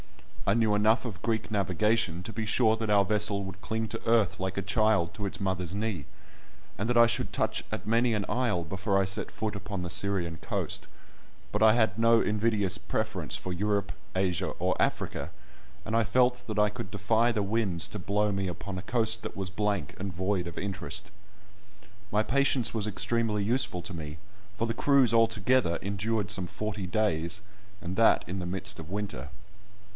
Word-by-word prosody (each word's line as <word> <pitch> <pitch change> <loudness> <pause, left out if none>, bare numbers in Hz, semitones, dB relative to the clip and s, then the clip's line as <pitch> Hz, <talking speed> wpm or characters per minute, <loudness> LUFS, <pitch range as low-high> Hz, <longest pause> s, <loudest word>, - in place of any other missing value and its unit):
I - - +4
knew 110 -2 +3
enough 110 +4 +3
of 95 -8 -6
Greek 110 +1 -1
navigation 100 -2 +1
to 110 - -6
be 110 -1 -3
sure 110 0 +3
that 110 -1 -3
our 100 -1 +5
vessel 105 0 +1
would 95 0 -8
cling 110 0 -2
to 115 +1 -4
earth 115 -5 +3
like 95 +1 -3
a 100 - -1
child 105 -4 +2
to 100 - -3
its 95 - -4
mother's 95 -2 -2
knee, 105 -8 -2 0.7
and 100 +5 -2
that 120 - +2
I 120 - +8
should 115 - -1
touch - - -1
at - - -5
many 115 +1 +3
an 100 -2 -1
isle 120 -9 0
before 95 +4 0
I - - +1
set 95 - -3
foot 110 -1 -3
upon 100 -2 -4
the 90 - -4
Syrian 90 -4 0
coast; - - -3 0.6
but 105 - -1
I 110 0 +7
had 110 -2 +2
no 115 0 +5
invidious 105 -3 +1
preference - - -1
for 90 - -5
Europe, 100 +2 0 0.2
Asia, 95 -2 +1
or - - +1
Africa, - - -1 0.6
and 110 - -1
I 115 - +4
felt 125 +3 +2
that 110 -2 -2
I 105 0 +4
could 105 - -7
defy 110 +4 +2
the 110 -3 0
winds 100 -5 0
to 105 - -6
blow 105 +3 +1
me 95 -1 -1
upon 95 +2 -5
a - - -5
coast 110 +1 +1
that - - -7
was 95 -1 -3
blank 100 -6 -1
and 95 +1 -3
void 95 0 -1
of 85 - -8
interest. 95 -2 -3 1.0
My 105 +1 +3
patience 130 -3 +2
was 110 -2 0
extremely 110 0 +1
useful 115 -5 +1
to 90 - -5
me, 75 -2 -6 0.4
for 115 - 0
the 115 - -1
cruise 130 -1 +4
altogether 115 -4 +3
endured 100 +1 -1
some 90 -1 -1
forty 105 -1 -4
days, 90 -1 0 0.4
and 90 -1 -5
that 115 +2 +4
in 95 +2 -3
the 90 - -4
midst 95 +2 -3
of 80 0 -8
winter. 100 -10 -4
105 Hz, 190 wpm, -29 LUFS, 95-110 Hz, 1.0 s, I